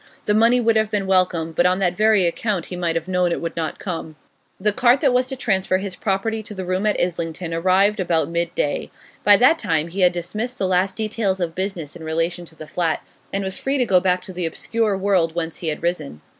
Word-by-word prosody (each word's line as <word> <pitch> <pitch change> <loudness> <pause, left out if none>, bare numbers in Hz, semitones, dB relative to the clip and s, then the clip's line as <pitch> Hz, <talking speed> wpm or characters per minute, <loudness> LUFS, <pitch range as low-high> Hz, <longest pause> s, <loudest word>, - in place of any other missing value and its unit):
The 210 - +2
money 230 +3 +4
would 230 -2 +3
have 220 -1 +1
been 205 -2 -1
welcome, 185 -3 +2
but 175 +3 +3
on 180 0 +2
that 180 -2 +1
very 215 -2 +4
account 180 +1 -1
he 180 - -6
might 170 -2 -1
have 165 +1 -2
known 180 -1 +1
it - - -1
would 165 0 -4
not 160 -2 -3
come. 165 -4 -5 0.4
The 210 +2 +1
cart 245 +4 +4
that 275 -5 +3
was 250 0 +2
to 265 - -4
transfer 190 -7 +1
his 190 -1 -5
property 215 +3 -1
to 210 0 -9
the 190 -1 -5
room 185 +3 0
in 210 - +2
Islington 170 -1 -2
arrived 190 +5 +2
about 165 -5 +1
mid 170 0 -2
day. 145 - -1 0.3
By 205 0 +7
that 290 +8 +5
time 160 - 0
he 190 +3 -3
had 180 -1 +6
dismissed 210 +8 -4
the 195 - -1
last 185 +1 +1
details 215 -3 -1
of 170 -2 -2
business 185 -5 -4
in 170 - -10
relation 165 +2 -1
to 160 - -15
the 155 - -9
flat, 165 0 -1 0.3
and 195 0 -1
was 190 0 -4
free 275 +1 0
to 250 - +2
go 190 -5 +4
back 180 0 +1
to 185 - -8
the 175 -2 -2
obscure 215 +4 -1
world 185 -4 +1
whence 165 -1 -3
he 170 - -5
had 155 +1 -3
risen. 155 - -2
185 Hz, 240 wpm, -21 LUFS, 170-210 Hz, 0.4 s, By